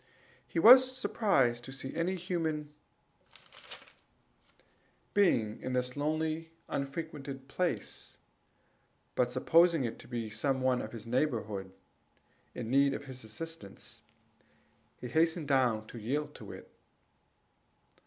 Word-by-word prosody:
He - - -6
was 255 +7 +8
surprised 135 - +2
to 130 - -8
see 135 0 -6
any 175 +3 0
human 160 -4 -2 2.4
being 120 - +2
in 130 - -3
this 125 0 -1
lonely 155 +2 -1 0.2
and - - -1
unfrequented 140 -3 -6
place; 140 - -3 1.0
but 125 -1 +1
supposing 165 +4 +4
it 115 - -4
to - - -13
be 115 -3 -4
some 135 +4 0
one 130 -1 +2
of - - -5
the 115 -1 -9
neighborhood 110 -7 -1 0.8
in 120 -1 -4
need 140 +1 +4
of 145 - -6
his 130 -2 -8
assistance, 110 -1 -8 1.0
he 125 - -6
hastened 160 +2 +1
down 125 -6 +2
to 115 - -9
yield 140 +8 -2 0.2
it. - - -11
135 Hz, 115 wpm, -32 LUFS, 120-165 Hz, 2.4 s, was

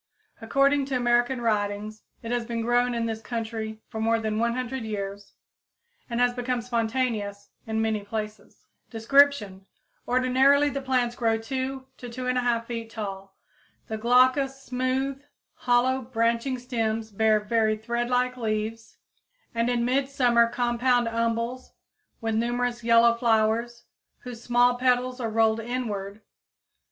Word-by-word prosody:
According 275 +4 +2
to 270 -1 -3
American 245 +1 +2
writings, 210 -1 -1 0.2
it 230 - -5
has 245 -1 0
been 230 -1 -3
grown 245 +1 +2
in 230 -1 -1
this 220 -1 -3
country 220 -2 -5
for 220 - -7
more 225 +1 +2
than 215 -1 -2
100 245 +2 -1
years 200 -2 -6 0.7
and 235 0 -2
has 245 0 +3
become 250 0 -2
spontaneous 225 -4 -2 0.2
in 220 0 0
many 215 -2 -1
places. 215 +1 -7 0.2
Description. 225 -5 +2 0.4
Ordinarily 265 +3 +3
the 275 - -3
plants 250 -3 0
grow 225 -2 +1
2 260 +3 -4
to 245 - -8
2 250 +2 -6
1/2 245 -2 0
feet 230 -1 -5
tall. 195 -3 -7 0.5
The 220 - -3
glaucous, 255 +3 +3
smooth, 260 +2 -2 0.3
hollow, 250 +2 +1
branching 235 +1 0
stems 225 -3 -2
bear 215 +1 +3
very 215 0 +1
threadlike 240 +3 -1
leaves 220 0 -3 0.6
and 230 +1 0
in 240 -1 +1
midsummer 250 -2 +3
compound 245 0 +1
umbels 230 +2 -2 0.5
with 225 -1 -1
numerous 240 +1 -1
yellow 230 0 +5
flowers, 235 0 +1 0.4
whose 245 -3 -9
small 245 +1 +3
petals 250 0 +1
are 230 -2 -2
rolled 220 0 +2
inward. 220 -4 -4
235 Hz, 130 wpm, -26 LUFS, 220-250 Hz, 0.7 s, yellow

